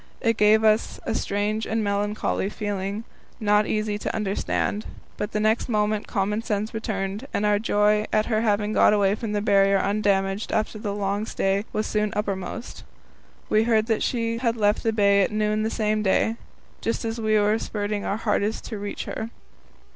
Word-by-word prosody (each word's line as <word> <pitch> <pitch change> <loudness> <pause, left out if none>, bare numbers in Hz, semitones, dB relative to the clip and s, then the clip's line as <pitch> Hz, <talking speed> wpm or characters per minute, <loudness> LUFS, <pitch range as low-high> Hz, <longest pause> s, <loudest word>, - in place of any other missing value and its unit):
It 230 -1 +1
gave 215 +1 +4
us 215 0 +2
a - - -1
strange 210 +1 -1
and 220 0 0
melancholy 205 -1 -1
feeling, 205 0 -3 0.4
not 210 -1 +3
easy 215 -1 -1
to - - -3
understand. 210 0 -1 0.3
But 210 +1 -4
the 210 - -1
next 220 +3 +1
moment 210 -1 0
common 205 +2 -1
sense 215 -2 -2
returned, 210 +1 -3
and 210 - +1
our 205 0 +3
joy 210 0 +2
at 215 0 +2
her 220 -2 +1
having 210 -1 +1
got - - +5
away 200 -2 +3
from 215 0 -4
the 205 -1 0
Barrier 195 -1 +4
undamaged 195 0 0
after 215 0 -1
the 205 -1 -3
long 205 +1 -1
stay 195 0 0
was 215 - -1
soon 210 -1 0
uppermost. 205 +2 -4 0.6
We 215 +1 +3
heard 220 -2 +3
that 225 -2 0
she 230 -1 -1
had 230 -2 0
left 210 0 +2
the 225 - +1
bay 200 -2 +4
at 190 - +1
noon 215 0 0
the 220 - 0
same 215 -1 0
day 215 +3 +1 0.4
just 230 +1 -2
as 225 +1 -3
we 215 -1 +3
were 210 +1 +2
spurting 205 -1 -3
our 200 - -1
hardest 215 -1 -1
to 215 - -5
reach 205 0 -5
her. 220 - -4
210 Hz, 185 wpm, -24 LUFS, 205-220 Hz, 0.6 s, got